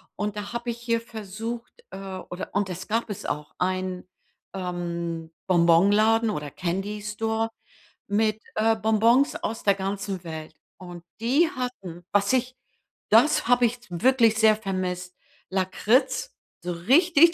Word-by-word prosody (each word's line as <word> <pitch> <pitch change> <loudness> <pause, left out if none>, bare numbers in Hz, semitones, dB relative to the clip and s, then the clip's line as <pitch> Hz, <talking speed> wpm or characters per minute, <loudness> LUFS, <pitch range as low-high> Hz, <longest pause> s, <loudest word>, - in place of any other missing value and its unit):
Und 210 0 -3
da 205 +2 -5
habe 235 0 -3
ich 235 0 -4
hier 230 -1 0
versucht, 225 +1 -6 0.2
äh 190 - -7 0.3
oder 180 +1 -6
und 200 -1 0
es 180 +1 -6
gab 225 +1 -1
es 205 - -6
auch 150 0 -4
einen, 185 0 -2 0.5
ähm, 170 -3 -4 0.2
Bonbonladen 200 +6 +4
oder 150 -8 -3
Candy 195 +6 -3
Store 220 +2 -1 0.6
mit, 215 +1 +1
äh, 225 +1 +3
Bonbons 225 - +3
aus 335 -10 -4
der 200 -1 +4
ganzen 195 -1 -3
Welt. 160 -2 -7 0.2
Und 175 -2 -10 0.2
die 280 +8 +3
hatten, 190 -9 -6
was 200 0 +3
ich 255 0 0 0.5
das 305 -2 +5
habe 245 0 +5
ich 240 +1 -1
s 240 - -20
wirklich 230 +4 +3
sehr 220 -1 +6
vermisst, 185 -3 -3 0.4
Lakritz, 230 - +1 0.3
so 180 - -2
richtig 330 - +5
210 Hz, 140 wpm, -25 LUFS, 180-235 Hz, 0.6 s, sehr